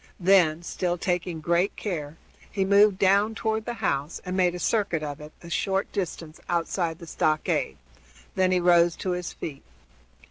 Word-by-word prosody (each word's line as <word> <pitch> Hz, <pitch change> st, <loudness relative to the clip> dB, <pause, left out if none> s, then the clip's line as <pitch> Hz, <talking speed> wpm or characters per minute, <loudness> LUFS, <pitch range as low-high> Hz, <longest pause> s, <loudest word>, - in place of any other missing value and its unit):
Then, 175 Hz, -3 st, +4 dB
still 175 Hz, 0 st, -2 dB
taking 175 Hz, -2 st, -2 dB
great 175 Hz, +4 st, +1 dB
care, 160 Hz, -6 st, -5 dB, 0.3 s
he 195 Hz, -2 st, -1 dB
moved 200 Hz, 0 st, +5 dB
down 200 Hz, +3 st, +3 dB
toward 220 Hz, -1 st, -1 dB
the 240 Hz, -, -4 dB
house 140 Hz, +3 st, -1 dB
and 180 Hz, 0 st, -3 dB
made 180 Hz, -2 st, +2 dB
a -, -, -5 dB
circuit 195 Hz, -7 st, 0 dB
of 145 Hz, 0 st, -5 dB
it 150 Hz, 0 st, -10 dB
a 170 Hz, -, -9 dB
short 195 Hz, +2 st, -1 dB
distance 165 Hz, -4 st, -5 dB
outside 170 Hz, -1 st, -1 dB
the 170 Hz, -, -11 dB
stockade; 155 Hz, -, 0 dB, 0.6 s
then 185 Hz, -1 st, +2 dB
he 185 Hz, -, +3 dB
rose 175 Hz, -1 st, +4 dB
to 185 Hz, -, -3 dB
his 180 Hz, -1 st, -3 dB
feet. 140 Hz, -4 st, -7 dB
175 Hz, 170 wpm, -26 LUFS, 165-195 Hz, 0.6 s, moved